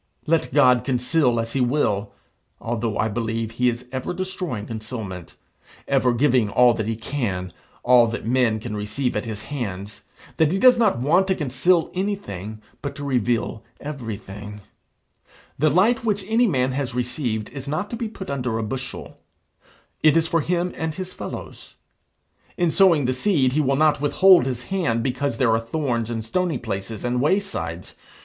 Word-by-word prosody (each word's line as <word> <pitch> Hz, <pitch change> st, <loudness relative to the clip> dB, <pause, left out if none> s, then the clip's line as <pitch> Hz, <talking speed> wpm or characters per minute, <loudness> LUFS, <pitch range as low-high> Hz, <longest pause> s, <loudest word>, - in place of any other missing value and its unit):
Let 165 Hz, 0 st, +1 dB
God 125 Hz, -4 st, +5 dB
conceal 125 Hz, -1 st, +1 dB
as 115 Hz, 0 st, -3 dB
he 135 Hz, -, +1 dB
will: 110 Hz, -6 st, 0 dB, 0.5 s
(although 115 Hz, -1 st, -2 dB
I 110 Hz, -, +1 dB
believe 115 Hz, 0 st, -2 dB
he 125 Hz, +2 st, +2 dB
is 120 Hz, +1 st, -5 dB
ever 130 Hz, +6 st, -3 dB
destroying 180 Hz, -, -4 dB
concealment, 110 Hz, -6 st, -7 dB, 0.5 s
ever 130 Hz, -2 st, +3 dB
giving 120 Hz, -3 st, +2 dB
all 125 Hz, +3 st, +5 dB
that 110 Hz, -2 st, -3 dB
he 115 Hz, -, -1 dB
can, 105 Hz, -, -3 dB, 0.3 s
all 120 Hz, -1 st, +6 dB
that 115 Hz, -1 st, -5 dB
men 120 Hz, -2 st, +2 dB
can 110 Hz, -1 st, -5 dB
receive 110 Hz, +5 st, -2 dB
at -, -, -2 dB
his 110 Hz, -1 st, -5 dB
hands, 105 Hz, -6 st, -5 dB, 0.3 s
that 160 Hz, -1 st, +3 dB
he 190 Hz, -, +1 dB
does 250 Hz, +2 st, +6 dB
not 215 Hz, -, +3 dB
want 165 Hz, +10 st, +3 dB
to 190 Hz, -, +2 dB
conceal 160 Hz, +4 st, +1 dB
anything, 110 Hz, -, -4 dB, 0.2 s
but 140 Hz, -, -5 dB
to 145 Hz, -, -7 dB
reveal 120 Hz, -4 st, -1 dB, 0.2 s
everything,) 105 Hz, -7 st, -7 dB, 1.0 s
the 155 Hz, +2 st, +4 dB
light 220 Hz, -, +3 dB
which 205 Hz, -3 st, 0 dB
any 230 Hz, +2 st, +3 dB
man 130 Hz, -7 st, +1 dB
has 130 Hz, -2 st, -3 dB
received 120 Hz, -3 st, -2 dB
is 140 Hz, -1 st, -8 dB
not 155 Hz, +8 st, -2 dB
to -, -, -2 dB
be 230 Hz, 0 st, -3 dB
put 190 Hz, -7 st, -7 dB
under 125 Hz, -4 st, -2 dB
a 115 Hz, -, -2 dB
bushel; 130 Hz, +4 st, -6 dB, 0.8 s
it 155 Hz, +1 st, +5 dB
is 165 Hz, 0 st, +2 dB
for 165 Hz, 0 st, +1 dB
him 175 Hz, +3 st, -1 dB
and 160 Hz, -1 st, -3 dB
his 185 Hz, -1 st, -6 dB
fellows. -, -, -8 dB, 0.8 s
In 175 Hz, -2 st, +2 dB
sowing 170 Hz, -6 st, +4 dB
the 130 Hz, -, +1 dB
seed 130 Hz, -3 st, +2 dB
he 155 Hz, -, +2 dB
will 135 Hz, -1 st, +1 dB
not 150 Hz, 0 st, +3 dB
withhold 175 Hz, 0 st, +5 dB
his 125 Hz, -2 st, -3 dB
hand 120 Hz, -9 st, -1 dB
because 130 Hz, -1 st, -1 dB
there 120 Hz, -2 st, +3 dB
are 110 Hz, -, +3 dB
thorns 120 Hz, -2 st, -2 dB
and 115 Hz, -2 st, -3 dB
stony 170 Hz, +5 st, 0 dB
places 105 Hz, -1 st, -5 dB
and 125 Hz, 0 st, 0 dB
waysides. 145 Hz, -, -1 dB
125 Hz, 170 wpm, -23 LUFS, 115-160 Hz, 1.0 s, all